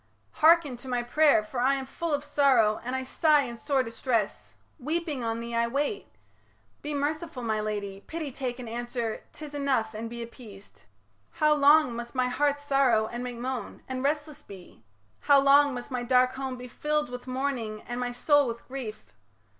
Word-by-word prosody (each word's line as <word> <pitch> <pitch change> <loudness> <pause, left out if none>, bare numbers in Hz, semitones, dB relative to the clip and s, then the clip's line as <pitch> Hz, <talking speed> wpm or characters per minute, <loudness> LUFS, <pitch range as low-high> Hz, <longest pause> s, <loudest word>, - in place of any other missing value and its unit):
hearken 320 -4 +5
to 245 +2 -12
my 245 -1 -1
pray'r, 285 -2 +4
For 245 +3 -5
I 265 +3 +3
am 270 -1 -4
full 330 +5 -4
of 290 -1 0
sorrow 250 -9 +3
and 250 +2 -3
I 260 - -2
sigh 300 +2 +3
In 240 -3 -6
sore 265 +3 0
distress; 230 -2 -2 0.3
weeping, 305 -1 -2
on 225 0 -2
thee 235 0 -6
I 235 0 +2
wait. 290 - -2 0.7
Be 295 0 -4
merciful, 300 -1 -3
my 220 -2 0
lady, 200 -2 -4
pity 320 -3 -4
take 250 -2 -4
And 250 -2 -8
answer, 235 -1 -3
"'Tis 300 -2 -10
enough 265 -6 0
and 225 +2 -5
be 235 0 -6
appeased 205 - -14 0.2
". 100 +1 -40
How 305 0 +5
long 290 -3 +5
must 235 +2 -7
my 255 -1 +1
heart 285 +3 +1
sorrow 275 -6 +2
and 240 +1 -4
make 245 -1 -5
moan 250 -2 -5
And 260 -1 -4
restless 295 +1 -2
be? 190 - -13 0.4
How 285 -1 +5
long 280 0 +5
must 245 +2 -7
my 250 -1 -2
dark 255 +1 +3
home 265 -1 -4
Be 250 0 -8
filled 300 +3 -1
with 250 +1 -8
mourning 255 -5 -3
and 240 0 -5
my 245 0 -2
soul 285 +3 +3
with 235 0 -6
grief? 255 -5 -6
255 Hz, 190 wpm, -28 LUFS, 235-285 Hz, 0.7 s, hearken